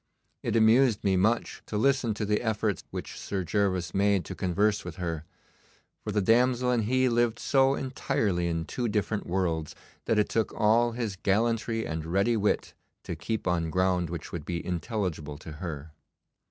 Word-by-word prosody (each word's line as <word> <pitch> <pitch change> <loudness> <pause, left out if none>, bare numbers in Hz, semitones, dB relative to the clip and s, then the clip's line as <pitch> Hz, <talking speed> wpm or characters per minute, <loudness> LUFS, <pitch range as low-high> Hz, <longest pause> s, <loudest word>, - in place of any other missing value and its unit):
It - - -2
amused 115 +1 +4
me 95 -1 +3
much 110 +6 +1
to 105 - -3
listen 125 -2 +2
to 105 - -2
the 105 0 +1
efforts 110 -4 -1
which - - -6
Sir 95 -2 -3
Gervas 95 -3 0
made 100 -3 +2
to - - -6
converse 100 +3 +1
with 90 -2 -7
her, 80 -3 -4 0.8
for 105 - -3
the 105 -1 +1
damsel 125 +3 +3
and 115 -3 +1
he 130 +3 +2
lived 120 -1 +2
so 135 +1 +3
entirely 105 -9 -1
in 85 -1 -1
two 120 +6 -2
different 105 0 -1
worlds, 85 -4 -1 0.3
that 115 - +1
it 105 - +3
took 115 -2 -1
all 115 +2 +3
his 115 -5 -3
gallantry 115 +3 0
and 80 0 -3
ready 100 +7 +2
wit 105 -1 0 0.3
to - - -4
keep 110 -2 -3
on 85 -2 0
ground 90 -1 +1
which 85 -1 -6
would 85 -3 -5
be 85 +1 -4
intelligible 90 -5 -3
to 80 +1 -10
her. 75 -2 -6
105 Hz, 175 wpm, -28 LUFS, 90-115 Hz, 0.8 s, amused